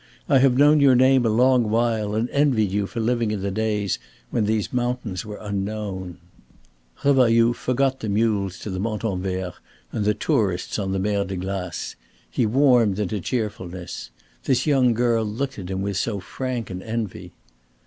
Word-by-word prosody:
I 135 - +5
have 130 -1 +4
known 150 +2 +6
your 135 -3 +6
name 130 -1 +4
a - - +2
long 125 0 +3
while 110 -2 0
and 110 +2 0
envied 130 -9 +2
you 100 0 0
for 115 - -6
living 115 0 +1
in 105 -2 -2
the 100 0 -2
days 105 -1 -1 0.3
when 115 -4 +1
these 110 +1 -1
mountains 120 -6 -2
were 105 -1 -6
unknown." 100 -3 -4 0.9
Revailloud 120 -4 +4
forgot 130 +2 0
the 110 - -4
mules 100 -3 0
to 105 - -5
the 95 - -3
Montanvert 95 -4 -2 0.4
and 105 - -2
the 105 0 +2
tourists 105 - 0
on 95 -2 -2
the 95 - 0
Mer 100 +1 0
de 95 0 -5
Glace. 95 -1 -4 0.4
He 120 - +1
warmed 120 -5 +4
into 105 -1 -2
cheerfulness. 95 - -4 0.4
This 130 -1 +2
young 130 -6 +3
girl 120 -1 +2
looked 125 +4 -3
at 90 -1 -7
him 95 0 -2
with 100 -1 -2
so 100 +1 -1
frank 120 +2 -4
an 90 0 -5
envy. 110 -3 -5
110 Hz, 170 wpm, -23 LUFS, 100-125 Hz, 0.9 s, known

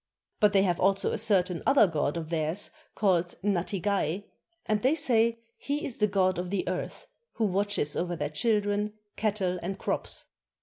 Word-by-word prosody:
But 210 -1 +5
they 195 -1 +5
have 175 -3 +1
also 195 +1 +2
a - - -2
certain 185 -5 +2
other 275 -5 +6
god 155 -3 -1
of 160 -2 -5
theirs, 160 +4 -1 0.2
called 180 -4 +2
Natigay, 195 -1 0 0.4
and 215 -1 +1
they 265 +5 +3
say 230 -6 +2 0.2
he 290 +1 -2
is 250 - -4
the 210 - +3
god 185 -3 +1
of 180 0 -3
the 200 0 -2
earth, - - -4 0.3
who 225 - 0
watches 200 -6 0
over 175 0 -1
their 150 -2 -3
children, 210 +3 +1 0.2
cattle, 195 -4 0
and 190 +3 -4
crops. - - -3
195 Hz, 170 wpm, -28 LUFS, 175-210 Hz, 0.4 s, other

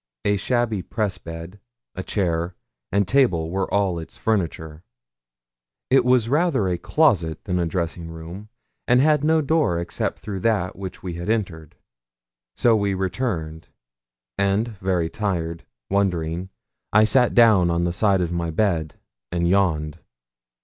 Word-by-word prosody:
A 105 - +3
shabby 115 -1 0
press 105 +1 -3
bed, 85 +4 -9 0.3
a 95 - -5
chair, 85 -3 -1 0.4
and 100 -1 +2
table 90 -11 +2
were 95 0 -2
all 95 -4 +1
its 80 - -10
furniture; 80 -7 -2 1.1
it 135 - +5
was 125 -2 +3
rather 145 - +2
a 90 -2 -1
closet 90 - +1
than 90 -2 -1
a 85 - 0
dressing 85 0 -3
room, 85 +6 -9 0.4
and 125 +1 +5
had 150 +1 +3
no 160 +1 +3
door 150 - +1
except 85 0 -4
that 100 -2 0
through 100 - -14
which 95 -2 -7
we 90 -2 -4
had 85 +3 -5
entered. 90 -9 -2 0.8
So 120 -2 +4
we 100 -2 0
returned, 90 -5 -3 0.7
and 100 +4 +1
very 95 -5 -1
tired, 85 -4 -3 0.2
wondering, 90 -2 -1 0.4
I 110 +1 +6
sat 125 +2 +3
down 110 -7 +6
on 85 0 +1
the 85 0 0
side 100 0 +2
of 85 -1 -1
my 85 -1 -2
bed 80 -3 0 0.4
and 85 0 0
yawned. 85 -5 +1
95 Hz, 145 wpm, -23 LUFS, 85-110 Hz, 1.1 s, I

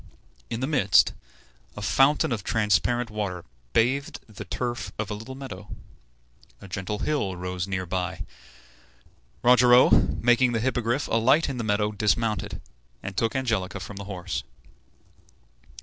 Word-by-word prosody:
In 115 - -4
the - - +1
midst, 125 -10 +4 0.6
a - - -5
fountain 140 +6 +3
of 110 -5 -2
transparent 115 +3 +1
water 100 -5 -4 0.3
bathed 130 - +1
the 110 -3 -9
turf 120 -1 -3
of 110 -1 -3
a - - -1
little 115 +5 -8
meadow. 105 -8 -9 0.9
A 100 - -11
gentle 95 +2 -4
hill 105 -9 -1
rose 90 0 -4
near 95 -1 -2
by. 90 +1 -3 1.2
Rogero, 125 0 +6
making 120 +1 +3
the 115 - +1
Hippogriff 120 +2 0
alight 130 +8 +3
in 135 - -4
the 120 - -2
meadow, 105 0 +1
dismounted, 105 -1 0 0.4
and 100 - -6
took 115 +3 0
Angelica 110 -7 -1
from 95 +2 -8
the 100 - -6
horse. 95 -2 -4
110 Hz, 135 wpm, -26 LUFS, 95-125 Hz, 1.2 s, Rogero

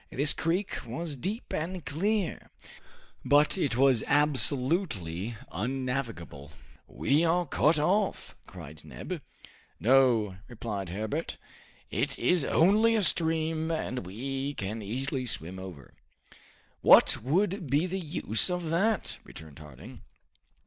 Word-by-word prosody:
This 145 +3 +4
creek 180 +5 -1
was 145 +6 -4
deep 200 - -5
and 170 +2 -4
clear, 195 +5 -2 0.7
but 145 +1 +4
it 140 -10 -1
was 130 -4 +4
absolutely 130 - +1
unnavigable. 115 - -4 0.3
"We 145 +4 +1
are 175 +1 +2
cut 150 +2 +2
off!" 190 +7 0
cried 80 -4 -11
Neb. - - -7 0.6
"No," 115 -6 +3
replied 105 -6 -5
Herbert, 110 - -4 0.5
"it - - -1
is 180 -4 +2
only 210 +10 +4
a 215 - +2
stream, 160 -1 +1
and 140 -7 -3
we 135 +7 -3
can 105 +3 -4
easily 130 +5 -3
swim 90 -2 -3
over." 90 -7 -10 0.9
"What - - +6
would 180 - 0
be 145 +6 +2
the 185 +1 -3
use 150 - +1
of 180 -3 -3
that?" 200 +4 0
returned 80 -2 -12
Harding. 75 -4 -12
135 Hz, 115 wpm, -28 LUFS, 110-170 Hz, 0.9 s, What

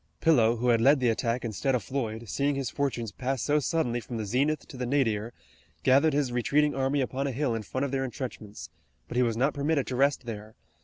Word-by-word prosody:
Pillow, 120 -8 +4
who 125 +2 0
had 115 -1 +4
led 140 +4 +5
the 125 -2 +2
attack 115 +2 -1
instead 120 +4 0
of 125 - -2
Floyd, 115 -4 -4
seeing 140 +5 0
his 135 -5 -3
fortunes 125 -6 -2
pass 130 +4 -2
so 150 +1 +2
suddenly 130 -4 0
from 120 +1 -6
the 110 - -3
zenith 140 +8 0
to - - -11
the 125 -1 -3
nadir, 115 -5 0 0.5
gathered 140 +4 +4
his 140 -3 0
retreating 145 +5 +2
army 135 +1 0
upon 135 +2 -2
a - - -1
hill 130 -1 -1
in 115 - -2
front 130 +6 -3
of 140 - -4
their 135 -1 0
intrenchments, 105 - -7 0.4
but - - -7
he 125 - +3
was 115 -2 +1
not 135 +5 +2
permitted 145 -1 0
to 130 - -4
rest 135 0 +2
there. 110 -1 -7
130 Hz, 225 wpm, -28 LUFS, 115-140 Hz, 0.5 s, led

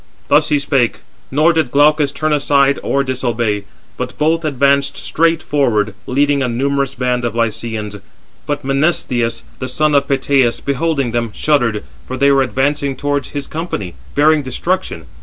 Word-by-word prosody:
Thus - - +4
he 150 - +3
spake, 135 -4 0 0.3
nor 155 +5 +3
did 160 -5 +1
Glaucus 145 +1 +3
turn 155 +1 -1
aside 140 -1 +2
or 140 - 0
disobey, 120 -5 -1 0.3
but - - -5
both 160 +2 +1
advanced 140 -1 +1
straight 165 0 +1
forward, 110 -8 +1
leading 140 +2 +2
a 130 - +1
numerous 140 +3 -1
band 125 -1 -1
of 120 -2 -2
Lycians. 115 -2 -2 0.5
But 145 -2 -3
Menestheus, 135 -5 0 0.2
the 130 - -4
son 155 +2 +1
of 140 0 +3
Peteus, 135 -3 +2
beholding 140 -2 -1
them, 120 -1 -1
shuddered, 120 -8 +1 0.2
for 130 - -4
they 140 +2 +4
were 135 -1 +4
advancing 135 +1 0
towards 145 0 -2
his 145 -1 -5
company, 155 - -5 0.2
bearing 150 +1 +4
destruction. 135 - -3
140 Hz, 155 wpm, -16 LUFS, 120-145 Hz, 0.5 s, Thus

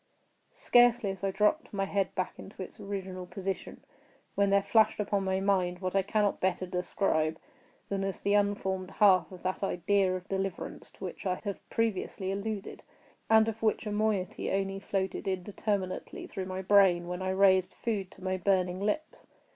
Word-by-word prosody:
Scarcely 245 - +4
had 190 - -13
I 195 - +2
dropped 210 +2 +1
my 195 -1 -1
head 195 -1 -1
back 185 - -3
into 195 -1 -8
its - - -12
original 190 -2 -5
position, 195 +1 -5 0.5
when 200 0 +2
there 200 0 +4
flashed 220 0 +3
upon 200 -1 0
my 190 0 0
mind 185 -2 +1
what 185 0 -3
I 195 - +5
cannot 205 +1 +1
better 185 0 0
describe 175 -3 0 0.5
than 195 -1 -2
as 195 -1 -3
the 200 - +1
unformed 195 -2 0
half 195 -3 +5
of 185 - -11
that 185 0 -2
idea 195 0 +1
of 185 +1 -7
deliverance 195 -2 -4
to - - -12
which - - -5
I 180 - +1
have 200 -3 -6
previously 200 -3 -1
alluded, 200 0 -4 0.5
and 220 0 +6
of 225 0 -4
which 220 0 +1
a 210 - -3
moiety 210 -2 0
only 195 0 -1
floated 195 -1 -2
indeterminately 190 0 -3
through 190 - -5
my 190 0 -4
brain 185 -3 +5
when 180 +1 -4
I 185 - -1
raised 190 -1 +4
food 205 -5 -2
to - - -15
my 185 0 0
burning 185 -1 +1
lips. 210 +11 -3
195 Hz, 175 wpm, -30 LUFS, 185-205 Hz, 0.5 s, and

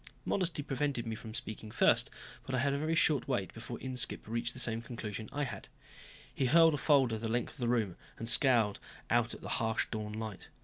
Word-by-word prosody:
Modesty 175 -6 0
prevented 135 -3 -1
me 115 -1 -3
from 110 -1 -9
speaking 110 -3 -6
first, - - +3 0.4
but 130 - -1
I - - +1
had 140 +2 +1
a 140 - -1
very 160 +2 0
short 150 -5 +3
wait 120 -9 -1
before 120 +1 -7
Inskipp 125 -5 -1
reached 115 +1 -2
the 130 - -4
same 115 -2 0
conclusion 110 -3 -6
I 145 - -1
had. 115 -8 -5 0.7
He 130 - 0
hurled 165 +3 +6
a - - 0
folder 130 -6 +3
the 115 0 -3
length 120 +1 -1
of 150 - -14
the 120 - 0
room 110 -7 0 0.2
and 115 - -4
scowled 115 -4 +5 0.3
out - - +2
at - - -13
the - - -7
harsh 110 0 +1
dawn 105 -1 -4
light. 110 -3 -6
120 Hz, 215 wpm, -32 LUFS, 110-140 Hz, 0.7 s, hurled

